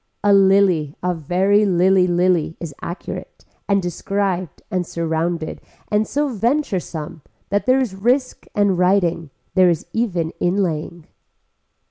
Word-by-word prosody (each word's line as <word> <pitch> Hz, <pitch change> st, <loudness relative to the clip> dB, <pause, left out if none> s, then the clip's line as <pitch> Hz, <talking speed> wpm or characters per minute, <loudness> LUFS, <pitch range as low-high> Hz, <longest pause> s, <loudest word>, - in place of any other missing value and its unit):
A 205 Hz, -1 st, +5 dB
lily 190 Hz, -6 st, +4 dB
a 180 Hz, 0 st, +1 dB
very 185 Hz, +6 st, +2 dB
lily 185 Hz, -1 st, +3 dB
lily 175 Hz, -2 st, +1 dB
is 165 Hz, -4 st, -6 dB
accurate 190 Hz, -, -7 dB, 0.2 s
and 200 Hz, -1 st, +2 dB
described 185 Hz, 0 st, -2 dB
and 185 Hz, -1 st, 0 dB
surrounded 165 Hz, 0 st, -2 dB, 0.3 s
and 210 Hz, +1 st, +1 dB
so 290 Hz, +1 st, 0 dB
venturesome 205 Hz, -, -2 dB, 0.3 s
that 205 Hz, +3 st, -1 dB
there 255 Hz, +1 st, +4 dB
is 250 Hz, -7 st, -1 dB
risk 250 Hz, +7 st, 0 dB
and 200 Hz, -3 st, +2 dB
writing, 180 Hz, -4 st, +2 dB, 0.2 s
there 185 Hz, -1 st, +5 dB
is 170 Hz, -3 st, -1 dB
even 180 Hz, -8 st, -1 dB
inlaying. 175 Hz, -3 st, -1 dB
185 Hz, 125 wpm, -20 LUFS, 170-205 Hz, 0.3 s, A